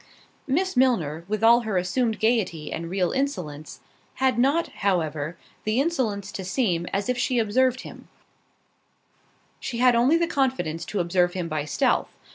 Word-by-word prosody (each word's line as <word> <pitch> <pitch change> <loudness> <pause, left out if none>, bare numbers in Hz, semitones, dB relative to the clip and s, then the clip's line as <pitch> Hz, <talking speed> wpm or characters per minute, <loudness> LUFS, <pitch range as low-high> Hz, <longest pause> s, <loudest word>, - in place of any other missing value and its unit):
Miss 365 +7 0
Milner, 170 - +1
with 215 +2 -2
all 235 +1 +7
her 220 -5 -2
assumed 225 +5 0
gaiety 210 -9 0
and 165 +1 -5
real 185 -1 0
insolence, 180 - -4 0.3
had 260 -3 +1
not, 285 +7 +2
however, 160 -4 -1 0.3
the 215 +3 0
insolence 235 - -1
to 190 - -6
seem 185 -4 0
as 200 +1 -1
if 250 -1 -1
she 250 0 0
observed 255 +3 +2
him; - - -11 1.5
she 235 - -5
had 250 0 +5
only 255 +8 +4
the 335 - +2
confidence 260 - -1
to 205 - -2
observe 175 +1 +1
him 180 -2 -3
by 155 -2 -2
stealth. 150 - +1
215 Hz, 155 wpm, -25 LUFS, 175-255 Hz, 1.5 s, all